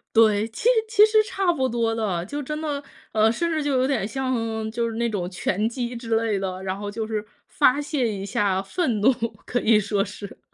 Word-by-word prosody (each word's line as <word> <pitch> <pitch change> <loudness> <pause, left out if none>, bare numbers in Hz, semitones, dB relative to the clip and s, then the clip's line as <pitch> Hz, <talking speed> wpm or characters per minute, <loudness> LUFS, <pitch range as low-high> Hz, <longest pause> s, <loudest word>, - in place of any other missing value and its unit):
对， 215 -1 +5
其 225 - -9
实 475 - +5 0.2
其 435 -1 +6
实 435 0 +4
差 385 -4 0
不 260 -5 0
多 230 -1 0
的， 195 -6 -1
就 290 +9 -4
真 300 +2 -4
的， 295 -2 -3 0.3
呃， 220 0 +4
甚 335 +9 -1
至 310 -2 0
就 290 - 0
有 255 - +3
点 260 -7 0
像 225 -3 -2
就 230 +1 -1
是 225 - -6
那 235 0 +1
种 185 -5 -3
拳 195 +3 -1
击 245 0 -4
之 230 -1 -2
类 225 -3 0
的， 190 -1 -4
然 190 0 -3
后 205 0 -5
就 220 +2 -3
是 215 -1 -3 0.2
发 260 +3 +3
泄 285 -5 -1
一 195 -1 -5
下 195 -1 +1
愤 230 - -1
怒， 250 +6 +6 0.3
可 245 - -1
以 220 -1 +5
说 200 -1 0
是。 200 0 -9
225 Hz, 240 characters per minute, -24 LUFS, 205-265 Hz, 0.3 s, 其